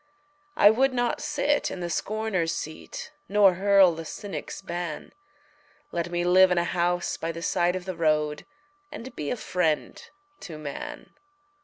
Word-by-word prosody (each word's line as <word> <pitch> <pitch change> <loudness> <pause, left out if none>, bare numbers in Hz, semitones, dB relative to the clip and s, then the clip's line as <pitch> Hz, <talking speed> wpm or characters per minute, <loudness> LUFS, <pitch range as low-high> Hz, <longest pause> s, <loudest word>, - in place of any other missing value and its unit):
I 205 - +8
would 260 +3 +2
not 245 -1 0
sit 290 0 0
in - - -6
the 175 - -3
scorner's 190 -3 -1
seat 480 - -7 0.2
Nor 200 -2 +5
hurl 195 -1 +5
the 165 0 -6
cynic's 200 +5 -6
ban 175 -4 -5 0.8
Let 170 0 -2
me 175 0 -1
live 185 +1 +6
in 180 - +1
a 170 - +3
house 175 0 0
by 165 - -3
the 165 0 -7
side 175 +2 +1
of 185 -1 -5
the 185 -1 -4
road 150 -2 0 0.4
And 260 -4 -8
be 150 - -4
a - - -1
friend 180 -7 -1 0.4
to 170 -5 -8
man. 150 -2 -7
180 Hz, 160 wpm, -26 LUFS, 165-205 Hz, 0.8 s, I